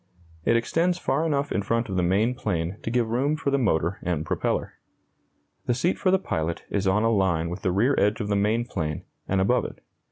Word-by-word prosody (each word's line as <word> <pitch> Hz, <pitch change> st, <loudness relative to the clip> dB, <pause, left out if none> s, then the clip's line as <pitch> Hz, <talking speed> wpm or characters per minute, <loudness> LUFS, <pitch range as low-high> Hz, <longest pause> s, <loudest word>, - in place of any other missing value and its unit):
It -, -, +4 dB
extends 170 Hz, +9 st, +1 dB
far 160 Hz, -1 st, 0 dB
enough 145 Hz, -2 st, 0 dB
in 100 Hz, -, 0 dB
front 115 Hz, +3 st, 0 dB
of 95 Hz, -, -4 dB
the 90 Hz, -, +2 dB
main 100 Hz, +7 st, +2 dB
plane 90 Hz, -6 st, -2 dB
to -, -, -4 dB
give 115 Hz, -1 st, 0 dB
room 140 Hz, +6 st, +1 dB
for 140 Hz, -2 st, -2 dB
the 140 Hz, -, +2 dB
motor 85 Hz, -6 st, +1 dB
and 80 Hz, -4 st, -2 dB
propeller. -, -, -1 dB, 0.9 s
The 120 Hz, -, +2 dB
seat 170 Hz, +9 st, 0 dB
for 185 Hz, -, +2 dB
the 190 Hz, -, +5 dB
pilot 80 Hz, -, -3 dB
is 100 Hz, -1 st, 0 dB
on 100 Hz, +3 st, +3 dB
a 115 Hz, -, +3 dB
line 85 Hz, -6 st, +1 dB
with 90 Hz, -, -6 dB
the 95 Hz, -, 0 dB
rear 115 Hz, +10 st, +2 dB
edge 105 Hz, +2 st, +2 dB
of 105 Hz, -, -2 dB
the 105 Hz, -, 0 dB
main 110 Hz, +4 st, +1 dB
plane, 75 Hz, -9 st, -3 dB, 0.2 s
and 95 Hz, -, +1 dB
above 95 Hz, -, +2 dB
it. -, -, -7 dB
105 Hz, 225 wpm, -25 LUFS, 95-125 Hz, 0.9 s, the